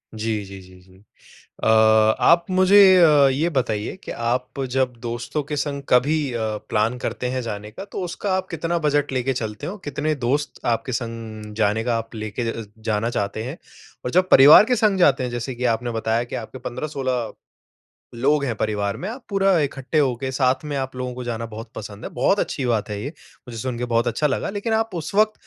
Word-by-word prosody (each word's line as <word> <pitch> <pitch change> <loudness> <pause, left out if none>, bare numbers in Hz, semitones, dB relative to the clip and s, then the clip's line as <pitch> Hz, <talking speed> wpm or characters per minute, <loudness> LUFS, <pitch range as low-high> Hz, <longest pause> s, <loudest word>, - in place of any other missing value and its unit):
जी, 110 -1 -2
जी, 95 0 -10
जी, 90 0 -16
जी। 95 0 -21 0.7
अ, - - -2
आप 110 +9 +5
मुझे 185 +2 +4 0.3
अ, 150 -4 +6
ये 150 +6 +1
बताइए 120 - -2
कि - - -7
आप 125 +3 -2
जब 130 0 +1
दोस्तों 120 +5 -3
के 145 +1 -5
संग 140 -1 -2
कभी 140 +2 +2
अ, 120 - -2 0.3
प्लान 110 +3 0
करते 125 - -3
हैं 130 0 -2
जाने 105 -2 -6
का, 110 - -8
तो 200 -1 -6
उसका 185 +3 -3
आप 185 0 -2
कितना 165 +1 -1
बजट 145 -1 +1
लेके 130 0 0
चलते 110 -4 -5
हो? 195 - -5
कितने 150 +2 -1
दोस्त 140 +3 -2
आपके 120 +2 -1
संग 115 -3 -5
जाने 110 0 +1
का 120 -1 +1
आप 115 +1 -8
लेके 110 +2 -4
ज - - -9
अ - - -4
ज - - -12 0.3
जाना 105 +3 0
चाहते 105 -1 -2
हैं? 135 +8 -6 0.5
और 125 - -2
जब 185 +6 +3
परिवार 145 +7 +9
के 250 +2 +1
संग 210 -3 +2
जाते 140 -6 +4
हैं, 125 - -3
जैसे 120 +2 -4
कि 125 +1 -5
आपने 120 +1 -5
बताया 115 +2 0
कि 120 - -9
आपके 120 +3 -7
15-16 130 -2 -3 0.8
लोग 140 +4 +2
हैं 125 -4 -1
परिवार 105 -1 -1
में। 185 - -5
आप 240 +4 -7
पूरा 195 -2 +3
इकट्ठे 140 +1 -2
होके 130 -2 0
साथ 130 +1 +1
में 145 -1 -3
आप 130 -1 -3
लोगों 125 0 -4
को 125 0 -6
जाना 115 -1 -3
बहुत 110 +1 -9
पसंद 105 0 -8
है, - - -5
बहुत 135 +11 +1
अच्छी 135 - -2
बात 115 -4 0
है 105 -1 -4
ये, 140 - -3 0.4
मुझे 115 -2 -7
सुनके 125 +1 -3
बहुत 120 0 +1
अच्छा 150 +6 0
लगा। 145 - -1
लेकिन 205 +3 -3
आप 225 -2 0
उस 165 +1 -5
वक़्त 215 +1 +4
125 Hz, 210 wpm, -22 LUFS, 115-150 Hz, 0.8 s, परिवार